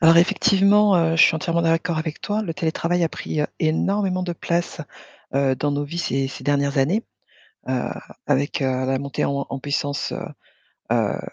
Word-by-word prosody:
Alors 165 0 +7
effectivement, 200 +2 +4
heu, 165 -1 +2
je - - +7
suis - - +6
entièrement 170 0 0
d'accord 165 0 +1
avec 160 -1 -4
toi. 215 +1 -1
Le 170 - -3
télétravail 170 +2 0
a 165 - +1
pris, 155 - -4
heu, 150 - +1
énormément 185 +4 0
de 180 -1 -2
place, 170 0 -2 0.5
heu, 135 -1 +2
dans 145 +3 -1
nos 145 +1 -1
vies 165 +4 -6
ces 135 -5 -1
ces - - -9
dernières 140 0 +1
années, 180 - +2 0.7
heu, 130 -1 0 0.4
avec, 140 +1 0
heu, - - +2 0.2
la 130 0 0
montée 140 0 -2
en 140 0 -1
en 135 - -4
puissance, 145 0 -2
heu - - -4 0.7
heu, - - +1
160 Hz, 185 wpm, -22 LUFS, 140-175 Hz, 0.7 s, Alors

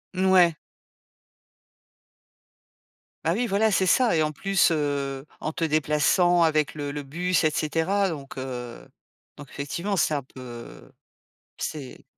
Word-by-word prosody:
N 185 - +1
ouais. 175 -3 +5 2.7
Bah 165 - +1
oui, 245 +2 0
voilà, 215 +1 +2
c'est 190 0 +2
ça, 225 -1 +3
et - - +3
en 155 0 0
plus, 195 +5 +2
heu, 140 -3 -2
en 155 - -4
te 165 - -3
déplaçant 155 +3 +3
avec 155 -2 +2
le 145 -1 -4
le 145 0 -5
bus, 175 +4 0
et 155 - +3
cetera, 165 +6 0
donc 140 -4 -7
heu, 125 -2 -6 0.5
donc 145 -2 -11
effectivement 170 +9 -3
c'est 155 -3 +2
un 140 -3 -1
peu, 125 -3 -11 0.7
c'est 145 -5 -6
155 Hz, 140 wpm, -25 LUFS, 140-180 Hz, 2.7 s, ouais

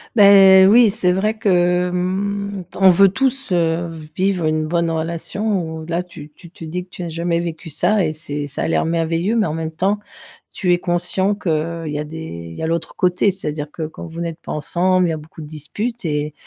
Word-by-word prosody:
Bah 195 -2 +8
oui, 225 +3 +6
c'est 190 -3 +1
vrai 210 +4 0
que, 180 -3 +2
mmh, 200 +2 -2
on 190 0 +6
veut 195 +2 +6
tous, 270 +4 -1
heu, 170 -1 +1 0.3
vivre 185 -3 0
une 155 0 0
bonne 170 +1 0
relation, 170 +5 -2 0.2
où 160 - -8
là, 170 +1 -1
tu 155 -4 -12
tu 170 - -15
te 165 - -13
dis 180 +3 -5
que - - -36
tu 180 - -8
as 170 - -4
jamais 170 +1 -1
vécu 165 0 -6
ça 185 +7 +1
et 155 - -2
c'est 145 -2 -5
ça 145 - -5
a - - -1
l'air - - +1
merveilleux, 165 +5 0
mais 225 - +2
en 155 - -2
même 160 0 -4
temps, 195 +5 0 0.5
tu 180 - 0
es - - +3
conscient 180 +3 0
qu'il 165 -3 -2
y 150 -1 -3
a 150 - -3
des 160 +2 -8 0.3
il - - -10
y - - -5
a - - 0
l'autre 165 0 -3
côté, 180 +2 +2
c'est-à-dire 150 -5 -4
que, 160 - -6
quand 160 - -9
vous 165 +1 -7
n'êtes 170 -1 -4
pas - - -6
ensemble, 180 +4 +1
il - - -1
y - - -1
a - - -3
beaucoup 155 +1 -12
de 150 - -8
disputes 205 - -5
et 150 -1 -2
175 Hz, 225 wpm, -19 LUFS, 160-190 Hz, 0.5 s, Bah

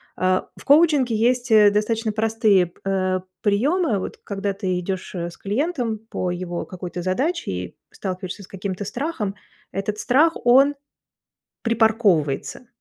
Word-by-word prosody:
А, 185 0 +1
в - - -14
коучинге 285 -5 +4
есть, 245 +1 +1
э, 210 -1 +7
достаточно 215 +1 0
простые 215 -4 +3
п 170 - -24
а, 185 -1 0 0.2
приёмы. 230 - +2
Вот - - -6
когда 200 0 -3
ты 185 -2 -2
идёшь, 190 +2 -5
э, 170 -1 -3
с - - -13
клиентом 240 - -1
по 180 -5 -2
его 175 -1 -4
какой-то 180 -1 -6
задаче 265 - -1
и 90 -1 -5 0.2
сталкиваешься 185 0 -5
с - - -13
каким-то 195 +1 -5
страхом, 240 - -3 0.4
этот 205 +2 -3
страх, 310 +6 +3
он 270 +4 +6 0.9
припарковывается. 220 - +1
205 Hz, 140 wpm, -22 LUFS, 185-240 Hz, 0.9 s, э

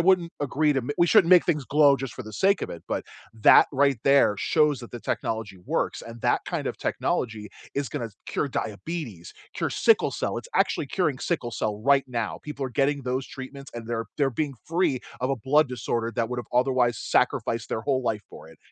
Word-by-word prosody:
wouldn't 175 -1 +3
agree 145 +2 +1
to 135 - +1
ma 135 - -3
we 175 - +5
shouldn't 185 -2 +5
make 180 -2 +7
things 150 -5 0
glow 145 0 +5
just 135 -2 -6
for 130 - -7
the 110 -2 -10
sake 195 - +2
of - - -3
it, 85 - -8
but - - -1 0.3
that 110 - +7
right 140 -2 +3
there 140 -7 +5
shows 150 +1 +2
that 120 - -10
the 120 - -7
technology 110 -5 -3
works - - -1
and 115 0 -10
that - - +2
kind - - -3
of - - -3
technology 110 -3 -2 0.3
is 140 -4 -1
gonna 115 - -4 0.2
cure - - -1
diabetes, 115 - -5 0.2
cure - - -1
sickle - - +3
cell, - - -3
it's - - -10
actually - - +1
curing - - 0
sickle 120 - -2
cell 105 -2 -3
right 140 +2 +4
now. 120 -4 -3
People 145 -2 -5
are - - -7
getting 140 +3 +1
those 130 +1 -2
treatments 140 0 -9
and 115 -1 -7
they're 115 -1 -2
they're 140 -2 +2
being 145 +2 -2
free 165 -6 +1 0.2
of 130 - +1
a 135 - 0
blood 145 +6 +3
disorder 115 -1 -2
that 115 -2 0
would 125 0 -4
have 120 - -5
otherwise 125 -2 +2
sacrificed 115 0 0
their 110 - -2
whole 130 +1 0
life 110 -3 -1
for - - -12
it. - - -17
130 Hz, 215 wpm, -26 LUFS, 115-145 Hz, 0.3 s, make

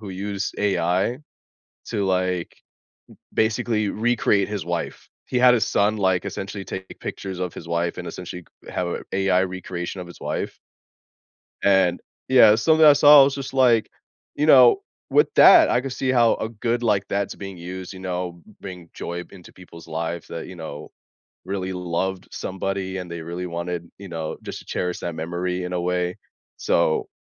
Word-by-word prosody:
who 105 - -8
used 100 +1 -4
AI 95 +3 +1 0.7
to, 100 - -1
like, 90 -2 -1 0.8
b - - +4
basically 110 -1 -1
recreate 110 -3 +1
his 105 -5 -4
wife. 85 0 -4 0.2
He 125 - -1
had 125 0 +6
his 115 - +1
son, 105 +2 +2
like, 95 -3 +1
essentially 95 0 -5
taking 95 0 -7
pictures 95 -2 -6
of 90 -2 -2
his - - -9
wife 85 0 -1
and - - -6
essentially 90 -1 -8 0.2
c - - -8
have 90 - -1
a - - -4
AI 95 -1 +2
recreation 95 -1 -5
of 90 - -7
his 85 - -13
wife - - -3 1.1
and 95 -3 +3 0.3
Yeah, 125 -5 +7
something 160 +8 +4
I 150 - +10
saw, 145 0 +8
I - - +9
was 135 0 0
just 135 -1 -6
like, 120 -4 +4 0.4
you 150 - 0
know, 130 -5 +7 0.3
with - - +3
that, - - +8
I - - +3
could 135 0 -5
see 130 +1 -1
how 120 -2 +4
a 110 - -3
good, 115 +2 -2
like, 105 -4 +2
that's 100 0 -2
being 95 -2 -8
used, 90 +2 -7
you - - -9
know, 90 -2 -4
b 110 - -18
bring 90 -4 -9
joy 85 +1 -5
into 90 -3 -14
people's 85 -3 -14
lives 85 +1 -4
that, 85 - -6
you 95 - -10
know, 80 -3 -8 0.5
really 95 0 -3
loved 90 +1 -3
somebody 95 0 -3
and 90 -2 -6
they 85 0 -5
really 85 +3 -5
wanted, 85 0 -5
you 100 0 -9
know, 80 -2 -4
just - - -7
to - - -15
cherish 90 -1 -3
that 85 - -4
memory 90 +3 -3
in 90 - -5
a 90 - -1
way, 90 0 -1 0.4
so 85 -2 +1
95 Hz, 185 wpm, -23 LUFS, 90-105 Hz, 1.1 s, I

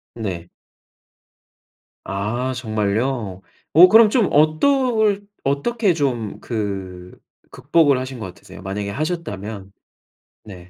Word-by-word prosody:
네. 95 -7 -5 1.6
아 110 +7 -2
정말요? 110 -2 -2 0.3
어 175 +4 +9
그럼 220 +1 +7
좀 230 -7 +2
어떨 210 - +2 0.2
어떻게 190 - +1
좀 125 -8 -2
그 95 -5 -5 0.3
극복을 150 -5 +2
하신 130 -1 -6
거 110 - -5
같으세요? 95 +1 -13
만약에 100 +1 -4
하셨다면. 105 - -5 0.7
네. 90 -4 -12
120 Hz, 190 characters per minute, -20 LUFS, 100-165 Hz, 1.6 s, 어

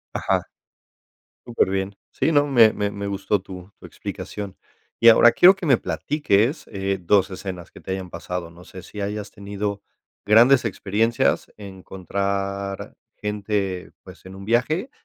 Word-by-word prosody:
Ajá. - - 0 1.0
Superbién. 95 -4 -1
Sí, 165 - 0
no, 145 -1 +4
me 120 -6 +6
me 100 0 -1
me 100 0 -5
gustó 100 0 -1
tu 95 0 -11
tu - - -11
explicación. 100 -2 -7 0.4
Y 115 - +7
ahora 115 +1 +8
quiero 185 +8 +7
que 195 - -8
me 135 -5 +5
platiques, 145 - 0
eh, 95 -1 -2
dos 95 +2 +2
escenas 95 -2 -7
que - - -14
te - - -5
hayan 95 -1 -5
pasado. 90 -1 -5
No 85 +1 -15
sé 95 0 -11
si 105 +3 -9
hayas 105 +1 -4
tenido 100 0 -5 0.4
grandes 120 +5 +6
experiencias, 115 +2 0
encontrar 100 0 -4 0.2
gente, 100 -3 -3
pues, - - -14
en 95 - -10
un 95 - -10
viaje 140 - 0
100 Hz, 150 wpm, -23 LUFS, 95-115 Hz, 1.0 s, ahora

